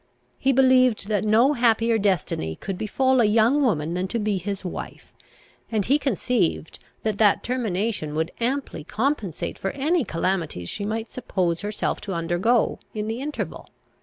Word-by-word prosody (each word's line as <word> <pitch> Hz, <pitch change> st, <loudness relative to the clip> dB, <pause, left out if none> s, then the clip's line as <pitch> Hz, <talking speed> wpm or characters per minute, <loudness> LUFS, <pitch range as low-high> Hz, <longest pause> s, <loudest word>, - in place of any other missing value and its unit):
He 270 Hz, -, +3 dB
believed 255 Hz, -5 st, +4 dB
that 210 Hz, -2 st, +1 dB
no 225 Hz, +7 st, +4 dB
happier 230 Hz, -2 st, +3 dB
destiny 175 Hz, -, 0 dB
could 195 Hz, -, -5 dB
befal 260 Hz, +6 st, +2 dB
a -, -, +4 dB
young 225 Hz, +7 st, +4 dB
woman 165 Hz, -, +1 dB
than 180 Hz, +1 st, -1 dB
to 235 Hz, -, -2 dB
be 210 Hz, -3 st, 0 dB
his 195 Hz, +1 st, -5 dB
wife; 180 Hz, -, -7 dB, 0.6 s
and 215 Hz, -4 st, 0 dB
he 285 Hz, +3 st, +3 dB
conceived 225 Hz, -, -1 dB, 0.2 s
that 215 Hz, -2 st, -1 dB
that 210 Hz, -2 st, +4 dB
termination 210 Hz, -9 st, -2 dB
would 160 Hz, +2 st, -1 dB
amply 255 Hz, -, -2 dB
compensate 220 Hz, -, -2 dB
for 195 Hz, -, -1 dB
any 310 Hz, +4 st, +1 dB
calamities 165 Hz, -, -2 dB
she 200 Hz, -, -4 dB
might 220 Hz, +2 st, -3 dB
suppose 180 Hz, -9 st, -1 dB
herself 210 Hz, +1 st, -2 dB
to 200 Hz, -2 st, -4 dB
undergo 175 Hz, +8 st, +1 dB, 0.2 s
in 210 Hz, 0 st, -2 dB
the 225 Hz, +3 st, -3 dB
interval. 295 Hz, +1 st, -5 dB
215 Hz, 160 wpm, -24 LUFS, 185-250 Hz, 0.6 s, believed